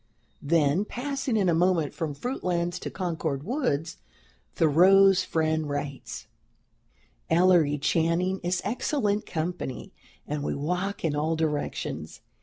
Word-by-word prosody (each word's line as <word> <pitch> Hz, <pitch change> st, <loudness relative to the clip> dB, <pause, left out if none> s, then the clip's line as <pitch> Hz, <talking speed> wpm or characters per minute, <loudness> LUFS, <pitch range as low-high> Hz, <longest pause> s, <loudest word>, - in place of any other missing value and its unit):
Then, 155 Hz, +3 st, +2 dB
passing 265 Hz, +1 st, -2 dB
in 195 Hz, -3 st, +2 dB
a 170 Hz, -, +3 dB
moment 170 Hz, -3 st, +2 dB
from 155 Hz, -4 st, -4 dB
"Fruitlands" 175 Hz, -, -2 dB
to -, -, -5 dB
Concord 160 Hz, -6 st, -3 dB
woods, 175 Hz, -, -1 dB, 0.6 s
Thoreau's 185 Hz, +4 st, +5 dB
friend 160 Hz, -3 st, 0 dB
writes: 145 Hz, -1 st, -5 dB, 1.0 s
"Ellery 165 Hz, -4 st, +4 dB
Channing 170 Hz, +5 st, +1 dB
is 175 Hz, 0 st, -1 dB
excellent 215 Hz, -1 st, -1 dB
company, 160 Hz, -5 st, -4 dB, 0.3 s
and 150 Hz, 0 st, -3 dB
we -, -, -2 dB
walk 180 Hz, +7 st, -2 dB
in 150 Hz, -2 st, 0 dB
all 155 Hz, +2 st, 0 dB
directions. 145 Hz, -, -3 dB
170 Hz, 115 wpm, -27 LUFS, 150-190 Hz, 1.0 s, Thoreau's